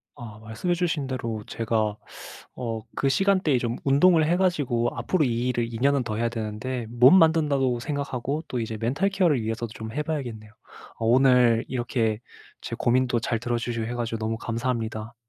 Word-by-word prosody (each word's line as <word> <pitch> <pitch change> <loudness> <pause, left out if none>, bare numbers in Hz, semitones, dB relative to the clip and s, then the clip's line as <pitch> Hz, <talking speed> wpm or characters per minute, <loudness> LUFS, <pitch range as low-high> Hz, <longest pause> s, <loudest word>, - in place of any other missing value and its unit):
아 110 -3 -10
말씀해 110 +11 -2
주신 165 -5 -1
대로 115 -4 -4
제가 110 -2 -1 0.6
어 115 -3 -3
그 135 - 0
시간대에 185 -3 +2
좀 120 0 -2
운동을 155 +4 +4
해 170 +3 +2
가지고 145 -11 +1
앞으로 180 -5 +1
이 120 -1 0
일을 120 -2 -1
2 115 - -5
년은 140 0 +3
더 110 -2 -3
해야 115 +1 0
되는데 115 +2 -4
몸 125 +10 +7
만든다고 145 -7 +2
생각하고 140 +1 -3
또 125 - -2
이제 110 -1 -4
멘탈 125 - 0
케어를 180 -9 +2
위해서도 115 +1 -3
좀 110 0 -7
해 150 - -1
봐야겠네요. 120 -9 -5 0.5
어 115 - -2
오늘 125 -2 +4
이렇게 120 -3 -1 0.4
제 - - -6
고민도 120 0 +2
잘 115 0 -1
들어주시고 120 -1 -2
해 120 - -4
가지고 115 -1 -3
너무 110 0 -2
감사합니다. 115 -1 -3
120 Hz, 365 characters per minute, -25 LUFS, 115-140 Hz, 0.6 s, 몸